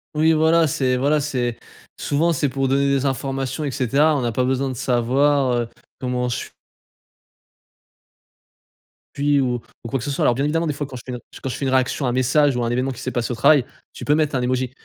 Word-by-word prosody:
Oui 160 +1 +4
voilà, 160 +1 +4
c'est 130 -2 0
voilà 145 +4 +2
c'est, 125 -5 -2 0.4
souvent 165 +4 +1
c'est 145 -1 0
pour 135 0 -1
donner 140 +1 +2
des 140 0 +1
informations 135 +1 -3
et 145 - -2
cetera 140 +4 +2
on 140 - 0
n'a 120 -1 -1
pas 125 +3 0
besoin 135 +1 0
de 130 - -5
savoir 130 +2 +2
heu, 120 -1 -1 0.3
comment 125 -1 -2
je 120 - -1
s - - -8 2.6
je - - -6
suis 145 -1 +3
ou 125 -2 -1 0.2
ou 115 - -6
quoi 135 - -1
que 115 - -6
ce - - -3
soit, 135 - -1
alors - - +4
bien 135 - -1
évidemment 165 +3 0
des 150 - -1
fois 145 0 -4
quand 135 - -10
je 120 - -9
fais 125 - -6
un 125 - -5 0.2
quand 135 - -2
je - - -4
fais 140 - -3
une 130 - 0
réaction 130 +2 +1
à - - +1
un - - 0
message 130 +3 +2
ou 120 - -1
à - - 0
un - - -1
événement 125 +2 0
qui 125 - -9
s'est 130 - -3
passé 120 -1 -2
au - - -2
travail, 140 +4 +5 0.3
tu - - -8
peux 145 - +3
mettre 155 -1 0
un 130 - 0
émoji 125 0 -1
135 Hz, 250 wpm, -21 LUFS, 125-145 Hz, 2.6 s, travail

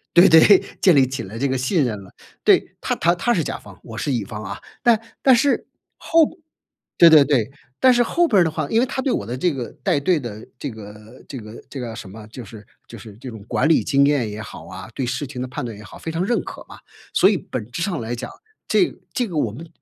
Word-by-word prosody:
对 175 +3 +8
对， 165 +4 +8 0.2
建 185 - +5
立 135 -2 +5
起 135 -5 -4
了 105 +4 -9
这 140 +3 0
个 130 0 -1
信 140 +4 +1
任 105 -4 -3
了。 95 - -17 0.3
对， - - +3
他 - - -1
他 170 +1 +2
他 240 +7 +1
是 165 - +1
甲 - - -4
方， 100 -2 -15
我 115 -1 -9
是 145 - -1
乙 115 -5 -1
方 105 +2 -7
啊， 95 - -6 0.2
但 235 -2 +4 0.2
但 260 -2 +6
是， 275 +4 +1 0.3
后 330 -1 +4 0.7
对 170 -1 +8
对 150 -3 +8
对， 130 -5 +1 0.3
但 260 -1 +6
是 245 - +2
后 345 +8 +2
边 200 -5 +4
儿 - - +5
的 160 - 0
话， 155 -2 -3
因 225 - +2
为 255 - +3
他 265 - -3
对 265 - 0
我 100 - -2
的 120 +3 -4
这 175 +6 +1
个 125 -4 -5
带 140 - +2
队 165 +3 +1
的 110 -4 -8
这 140 - -5
个 110 +1 -12
这 135 - -7
个 110 0 -10
这 135 - -7
个 115 -2 -6
什 100 - -8
么， 105 +3 -11
就 120 +2 -9
是 105 0 -12 0.2
就 - - -11
是 110 -3 -12
这 130 +3 -9
种 110 -4 -9
管 155 - +1
理 165 - +4
经 140 0 +3
验 135 -7 +1
也 105 +1 -7
好 80 -6 -9
啊、 95 +3 -9
对 130 - -2
事 130 +4 -3
情 125 -2 -6
的 130 - -4
判 125 - -5
断 115 -3 -6
也 105 - -12
好， 100 - -12
非 160 - -5
常 170 +3 -1
认 240 - +1
可 - - -9
嘛。 - - -12 0.3
所 190 - +5
以 205 - +2
本 115 -8 -6
质 170 - -3
上 175 -4 -2
来 115 +1 -4
讲， 120 +1 -6 0.4
这 - - +2 0.2
这 245 - -1
个 175 -7 -7
我 120 -7 +1
们 160 +10 -10
135 Hz, 285 characters per minute, -21 LUFS, 110-170 Hz, 0.7 s, 对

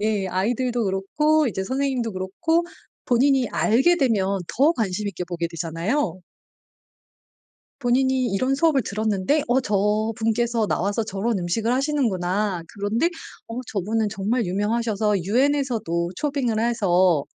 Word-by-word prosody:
예. 210 -2 0
아이들도 235 +6 0
그렇고 295 +11 +1
이제 190 -4 -2
선생님도 260 -1 -1
그렇고 320 - 0 0.4
본인이 260 +1 +3
알게 270 +11 +3
되면 200 - +1 0.2
더 290 +6 +5
관심 210 - -2
있게 180 -2 -5
보게 170 -1 -3
되잖아요. 170 - -2 1.6
본인이 260 +1 +2
이런 255 +7 +1
수업을 305 -3 +3
들었는데 215 +7 0
"어. 255 +2 +3
저분께서 220 +2 0
나와서 200 +5 0
저런 210 +1 -2
음식을 210 +7 -1
하시는구나. 210 - 0
그런데 210 +11 0 0.4
어 230 +2 -5
저분은 215 +2 -1
정말 220 +3 -1
유명하셔서 210 0 0
유엔에서도 230 - 0
초빙을 270 -6 -1
해서 185 -9 +2
220 Hz, 305 characters per minute, -23 LUFS, 195-255 Hz, 1.6 s, 더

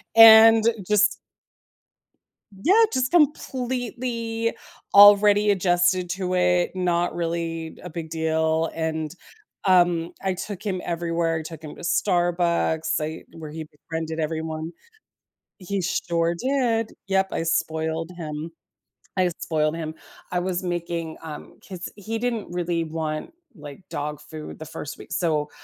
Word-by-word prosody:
and 225 0 +9 0.2
just 210 0 +5 1.6
Yeah, 410 +7 +6
just 255 -1 0
completely 245 -6 0 0.4
already 205 +1 +7
adjusted 180 -1 +2
to 185 0 -2
it, 180 -1 +2
not 175 -2 0
really 165 -1 -3
a 180 - -7
big 160 -1 -6
deal, 160 0 0
and, 160 -1 -3 0.5
um, 175 -3 +3
I 190 -1 0
took 195 +1 -6
him 195 -4 -2
everywhere, 165 -1 -1
I - - -5
took 160 0 -9
him 150 - -8
to - - -12
Starbucks, 170 -3 +1
I 155 +1 -4
where 160 -2 -8
he 160 +1 -6
befriended 160 +1 -6
everyone. 160 0 -3 0.9
He 195 +1 -3
sure 170 -1 0
did! 235 -1 0 0.2
Yep, 190 0 +2
I - - -2
spoiled 160 0 -1
him, 155 -1 -5 0.7
I 185 -1 +3
spoiled 155 -1 0
him. 160 -1 -5 0.4
I 180 - +1
was 180 0 -2
making 170 -2 -3
um, 155 -2 -9
'cause 180 -2 -6
he 220 +3 -4
didn't 235 -2 -2
really 175 -1 -1
want, 155 - -4 0.2
like, 145 +2 -11
dog 150 0 -4
food 150 0 -9
the 155 - -7
first 145 -1 -7
week. - - -13
So, 155 -4 0
170 Hz, 130 wpm, -24 LUFS, 160-195 Hz, 1.6 s, and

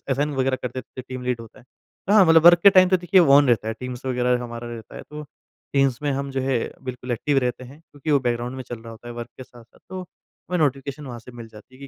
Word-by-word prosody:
Assign 145 +3 0
वग़ैरह 130 0 0
कर 125 - -2
देते 130 0 -8
टीम 130 0 -8
लीड 125 -2 -2
होता 115 -1 -13
है। - - -18 0.4
तो 200 - +1
हाँ 210 -3 +7
मतलब 165 0 +5
वर्क 175 0 +8
के 200 - +9
टाइम 185 -2 +6
तो 185 - +4
देखिए 180 +1 +3
ऑन 145 -3 +6
रहता 110 -2 +2
है 110 - -2
टीम्स 125 0 -7
वग़ैरह 125 -1 +1
हमारा 120 0 -7
रहता 115 -2 -9
है। - - -8
तो 150 0 -7 0.5
टीम्स 135 -3 +2
में 145 - 0
हम 140 +1 -3
जो 135 0 -2
है 130 -1 0 0.2
बिल्कुल 125 -1 -7
एक्टिव 140 +4 +1
रहते 125 0 -2
हैं 135 +4 -13
क्योंकि 155 -2 -7
वो 145 - +5
बैकग्राउंड 120 0 -2
में 130 - -5
चल 120 - -6
रहा 115 - -10
होता 115 +1 -11
है 120 - -7
वर्क 120 0 -7
के - - -9
साथ-साथ 120 -2 -19
तो 185 +1 -6
हमें 180 0 -8
नोटिफिकेशन 140 -1 -1
वहाँ 120 -2 -7
से 120 +2 -14
मिल 120 -2 -10
जाती 110 +4 -16
हैं - - -20
130 Hz, 270 wpm, -23 LUFS, 120-145 Hz, 0.5 s, के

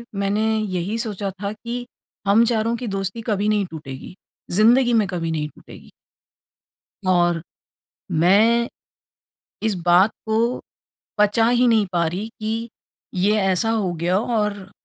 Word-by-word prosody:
मैंने 200 +2 0
यही 195 +1 -2
सोचा 205 -3 -3
था 200 - -1
कि 240 +3 -6 0.4
हम 215 +4 +5
चारों 230 0 +1
की 240 0 -5
दोस्ती 195 +3 -3
कभी 210 -1 0
नहीं 210 -2 +2
टूटेगी, 150 +1 -9 0.4
ज़िन्दगी 235 +6 +4
में 215 -3 +3
कभी 170 -4 -3
नहीं 150 -1 -2
टूटेगी। - - -15 1.2
और 175 -2 +3 0.8
मैं 225 +7 +4 1.0
इस 220 -2 +1
बात 180 +5 +5
को 225 +3 0 0.6
पचा 210 +2 +3
ही 245 0 +3
नहीं 220 -3 +4
पा 170 -1 +2
रही 185 +6 -3
कि 225 +2 -3 0.5
ये 200 +4 +2
ऐसा 195 +2 +1
हो 215 -5 0
गया। 175 +3 0
और 210 -4 -2
210 Hz, 135 wpm, -22 LUFS, 185-225 Hz, 1.2 s, हम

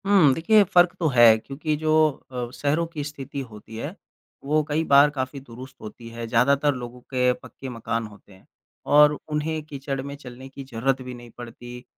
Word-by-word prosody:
हुँ। 190 -9 +5
देखिए, 210 +8 +4
फ़र्क 175 -2 +4
तो 165 - +1
है 115 -2 +8
क्योंकि 145 +6 -3
जो 155 +1 -1 0.4
अ, 125 -2 -4
शहरों 145 +5 0
की 160 -3 -6
स्थिति 140 -1 -7
होती 110 +1 -12
है, 145 - -5 0.5
वो 150 +3 +2
कई 155 +2 +1
बार 140 -1 +6
काफ़ी 135 -1 -4
दुरुस्त 130 0 -12
होती 115 +2 -10
है 115 0 -6
ज़्यादातर 140 +5 +3
लोगों 125 0 -8
के 125 0 +1
पक्के 135 +1 -10
मकान 115 -1 -3
होते 105 -1 -17
हैं। 95 - -21 0.4
और 150 0 +5
उन्हें 155 +1 -1
कीचड़ 140 -2 -5
में 140 +1 -7
चलने 130 -2 -11
की 135 +1 -9
ज़रूरत 130 +1 -1
भी 125 0 -7
नहीं 120 -1 -11
पड़ती, 120 +1 -10
135 Hz, 185 wpm, -24 LUFS, 120-150 Hz, 0.5 s, है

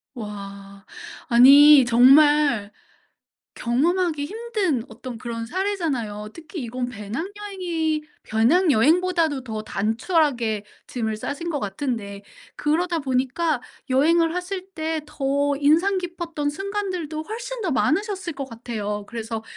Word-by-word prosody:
와. 200 -2 -9 0.4
아니 275 +3 +8
정말 260 -2 +5 0.9
경험하기 305 +5 0
힘든 415 - -2
어떤 255 -4 -8
그런 230 0 -5
사례잖아요. 280 - -2
특히 330 +1 -8
이건 245 +1 -4
배낭여행이 325 - -3 0.2
배낭여행보다도 315 - +2
더 220 -3 -5
단촐하게 225 - 0 0.2
짐을 220 -3 -3
싸신 285 +9 -4
것 295 -3 -2
같은데 200 -1 -4 0.3
그러다 335 +3 0
보니까 270 +2 0 0.3
여행을 330 +5 +3
하실 370 +1 -4
때 320 -1 -2
더 285 +1 0
인상 335 +7 +3
깊었던 340 -4 -3
순간들도 365 -3 -4
훨씬 475 +7 -6
더 365 - -1
많으셨을 380 +5 0
것 275 -2 -6
같아요. 215 -3 -5
그래서 225 -1 -5
290 Hz, 260 characters per minute, -23 LUFS, 235-345 Hz, 0.9 s, 아니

